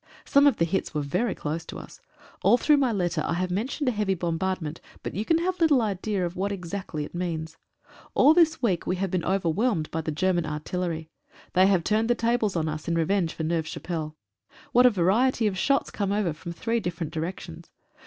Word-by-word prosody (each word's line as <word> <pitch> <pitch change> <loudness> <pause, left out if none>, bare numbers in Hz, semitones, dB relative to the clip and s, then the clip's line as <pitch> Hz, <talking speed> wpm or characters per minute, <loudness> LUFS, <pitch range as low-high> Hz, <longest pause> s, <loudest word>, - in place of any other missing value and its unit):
Some 280 +1 +5
of 285 - +3
the 165 - +2
hits 170 -1 -2
were 150 - 0
very 185 +10 -1
close 155 +2 -3
to - - -8
us. - - -11 0.4
All 240 - +5
through 300 +3 +4
my 265 -4 +2
letter 175 -6 0
I - - -1
have 180 +1 -1
mentioned 255 - -2
a - - +4
heavy 205 -4 0
bombardment, 170 -1 -2 0.2
but - - -4
you 205 - -2
can 325 +8 +2
have 365 +2 -1
little 305 -5 +5
idea 200 -3 -1
what 190 +3 -3
it - - -1
exactly 175 -4 -5
means. 165 -3 -3 0.6
All 290 +4 +7
this 320 -3 +3
week 185 -8 0
we 185 - +1
have 190 0 -2
been 180 -3 0
overwhelmed 190 0 0
by 165 - -2
the 160 - -3
German 175 +2 +1
artil 155 +4 -4
lery. 165 -3 -3 0.4
They 185 +1 +5
have 190 -4 +3
turned 220 +4 +1
the 240 - +4
tables 230 -4 0
on 160 -2 0
us 155 0 -5
in 170 - 0
revenge 170 +1 +1
for 160 - -4
Neuve 160 0 -1
Chapelle. 160 -2 -5 0.6
What 250 +1 +6
a - - +7
variety 220 +5 +2
of 205 -3 +1
shots 275 +7 +1
came 200 -2 -2
over 200 -5 0
from 170 +3 -8
three 230 +7 -1
different 170 -5 -4
directions. 160 - -6
185 Hz, 215 wpm, -26 LUFS, 165-225 Hz, 0.6 s, All